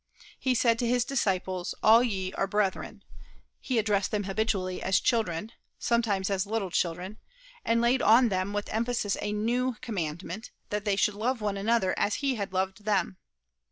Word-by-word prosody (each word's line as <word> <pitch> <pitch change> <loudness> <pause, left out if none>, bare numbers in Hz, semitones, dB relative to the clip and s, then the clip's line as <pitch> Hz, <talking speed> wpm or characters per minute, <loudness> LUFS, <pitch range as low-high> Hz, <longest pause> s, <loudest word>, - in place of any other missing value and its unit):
He 260 -1 +1
said 230 -1 +3
to 240 - 0
his 245 0 +2
disciples, 185 -8 -1
"All 225 +2 +7
ye 190 -6 -2
are 195 - -1
brethren;" 200 -1 -2 0.6
he 255 - -2
addressed 205 -3 +1
them 210 -1 -1
habitually 195 -2 -1
as 190 0 +2
"children," 220 -4 0 0.3
sometimes 210 -5 0
as 195 0 0
"little 210 -4 -2
children," 180 +5 -2 0.5
and 230 0 +2
laid 245 +2 +3
on 235 +2 +6
them 185 0 -1
with 205 0 -3
emphasis 230 -2 -1
a 210 - -2
new 240 +4 0
commandment, 185 -2 -4 0.2
that 210 0 -2
they 205 -2 +2
should 205 +1 +2
love 235 +5 -1
one 205 -2 -1
another 200 -1 +1
as 205 - +1
he 275 -2 0
had 200 -5 -4
loved 190 +2 -2
them. 195 -3 0
210 Hz, 170 wpm, -28 LUFS, 190-230 Hz, 0.6 s, All